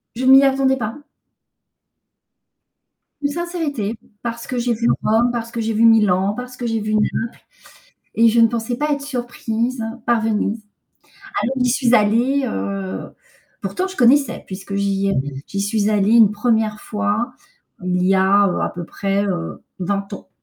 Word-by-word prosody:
Je 255 +2 -3
m'y 265 +1 +8
attendais 270 -1 +2
pas. 225 +1 -4 2.2
Une 285 0 0
sincérité, 305 - -3 0.2
parce 235 0 -5
que 255 - -3
j'ai 240 0 +1
vu 230 +1 -1 0.2
Rome, 230 +3 +3
parce 230 -1 -4
que 235 - -5
j'ai 225 0 -1
vu 225 +2 +3
Milan, 205 -3 +4
parce 250 0 -7
que 245 -2 -4
j'ai 225 0 0
vu 215 0 -3
Naples, 215 0 +1 0.9
et 230 +1 +5
je 230 +1 +3
ne 230 - +7
pensais 235 +1 -3
pas 295 +4 -1
être 285 -1 -1
surprise 245 -3 -3 0.2
par 235 -1 +2
Venise. 215 0 -1 0.8
Alors, 260 +3 -1
j'y 250 -1 +2
suis 245 -1 +2
allée, 240 +7 +2
heu, 95 -1 -4 0.5
pourtant 280 - -2
je 380 - -10
connaissais, 270 +3 +3
puisque 195 +1 -6
j'y 200 0 0
avais 140 -6 -1
j'y 200 - -4
suis 205 +1 0
allée 210 +1 +2
une 220 -3 +7
1re 215 -1 0
fois, 215 +2 -2 0.5
il 180 0 0
y 195 +1 +4
a, 195 +2 +4
heu, 180 - -1
à - - 0
peu 175 -1 -7
près, 200 +3 -1
heu, 175 -4 -4 0.2
20 200 +2 -2
ans. - - -10
225 Hz, 165 wpm, -20 LUFS, 200-245 Hz, 2.2 s, m'y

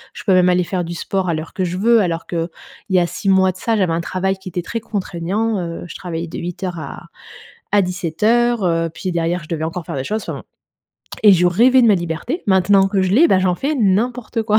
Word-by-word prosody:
je - - -8
peux 195 - +3
même 180 0 +5
aller 180 0 +3
faire 180 0 -2
du 170 0 -6
sport 185 +2 -2
à 165 - +1
l'heure 155 +1 -6
que 190 - -2
je 180 0 -2
veux, 230 +4 +4
alors 170 -3 -2
qu'il 170 -1 -2 0.4
y 190 - +3
a 175 - +2
6 195 - -3
mois 190 -1 +4
de 185 - -14
ça, 225 +3 0
j'avais 185 -5 +1
un 165 - -1
travail 190 +2 -2
qui 190 0 -9
était 175 0 -4
très 230 - -4
contraignant. 205 +1 -2
Heu, 170 -1 -5
je - - -9
travaillais 170 -2 -5
de 160 - -7
08:00 175 0 -5
à - - -8 0.7
à 205 -1 +5
17:00, 205 +7 +1
heu, 165 -1 +1
puis 185 - -4
derrière 170 +1 -1
je 155 - -14
devais 160 -2 -2
encore 165 +1 -4
faire - - -5
des 130 - -3
choses, 215 +9 -2
enfin, - - -5
bon. - - -9 0.8
Et 210 -2 +8
je 180 -1 +4
rêvais 240 +9 +5
de - - +5
ma 210 - +6
liberté. 175 - -3
Maintenant 195 0 +4
que 195 -1 0
je 185 - 0
l'ai, 300 +10 +6
bah, 190 - +4
j'en 185 -1 +1
fais 280 +11 -2
n'importe 230 +1 0
quoi. 215 -1 +3
185 Hz, 250 wpm, -19 LUFS, 170-210 Hz, 0.8 s, Et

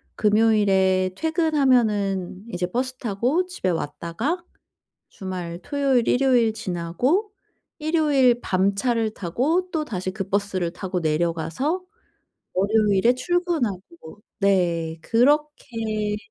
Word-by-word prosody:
금요일에 200 -4 +3
퇴근하면은 245 - +1
이제 180 -1 -2
버스 255 +2 -2
타고 250 - 0
집에 360 - -3
왔다가 175 - -3 0.7
주말 180 -3 -6
토요일 275 -3 +1
일요일 245 -4 +3
지나고 220 - -1 0.5
일요일 295 -6 +3
밤차를 215 +4 0
타고 290 - -1
또다시 215 - -3
그 195 -1 -5
버스를 195 -4 -1
타고 185 -1 -4
내려가서 165 - -1 0.7
월요일에 210 +3 +3
출근하고 290 - -1 0.6
네. 170 -5 +1
그렇게 230 - 0
215 Hz, 235 characters per minute, -23 LUFS, 185-270 Hz, 0.7 s, 금요일에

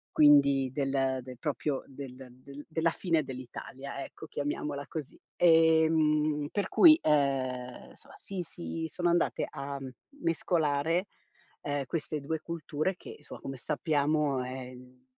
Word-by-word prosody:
quindi 140 -3 +6
del 135 -1 0
del 125 -1 -10
proprio 140 0 -2
del 135 -1 -9 0.3
del 140 +1 -10
della 165 +1 +1
fine 165 -3 0
dell'Italia, 135 +1 -7
ecco, 160 - -11
chiamiamola 145 -1 -3
così. 155 -3 -6 0.2
Ehm, 160 -3 +4
per 205 - -1
cui, 325 -2 +8
ehm, 130 -4 0
insomma - - -17
si 195 -2 -6
si 165 -1 -5
sono 175 -1 0
andate 175 - +1
a 140 -1 -5
m 135 - -6 0.3
mescolare, 165 +1 +1 0.6
uhm, 145 -1 -2
queste 155 0 -3
2 155 +3 -3
culture 170 +2 -3
che, - - -10
insomma, 150 - -11
come 135 0 -6
sappiamo, 145 -2 +1
ehm, 125 0 -9
145 Hz, 130 wpm, -30 LUFS, 135-160 Hz, 0.6 s, cui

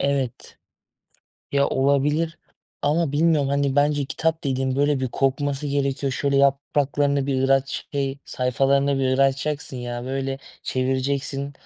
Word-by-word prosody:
Evet, 140 -3 -2 0.9
ya, 140 0 +3
olabilir 145 +4 +1 0.4
ama 150 +1 +1
bilmiyorum, 150 -2 +3
hani, 140 -1 0
bence 145 0 +2
kitap 160 +4 -2
dediğin 130 -1 0
böyle 145 -1 +2
bir 130 - -1
kokması 140 +3 -1
gerekiyor. 140 -1 -1
Şöyle 140 +2 0
yapraklarında 140 0 +2
bir 135 -1 +1
aç 135 0 0
şey, 140 -1 -2
sayfalarını 135 +2 +1
bir 130 0 +1
açacaksın 135 +1 0
ya. 120 0 -5
Böyle 135 +1 -3 0.2
çevireceksin. 135 +2 -1
140 Hz, 125 wpm, -23 LUFS, 135-145 Hz, 0.9 s, ya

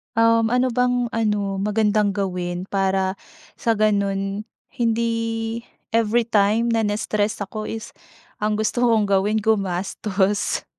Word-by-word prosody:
Um, 230 0 +4
ano 250 +1 +2
bang 245 -1 +1
ano, 205 -3 0
magandang 210 -1 +1
gawin? 180 -2 -2
Para 190 -1 0 0.4
sa 230 -3 +1
ganun 200 0 0 0.2
hindi, 230 -1 -1 0.3
everytime 230 0 +2
na 225 -2 +1
nas-stress 205 0 -1
ako 215 +2 -6
is, 225 0 -6 0.5
ang 210 0 0
gusto 220 +3 -1
kong 220 -2 +3
gawin 205 +2 +2
gumastos. 200 0 0
215 Hz, 110 wpm, -22 LUFS, 200-230 Hz, 0.5 s, Um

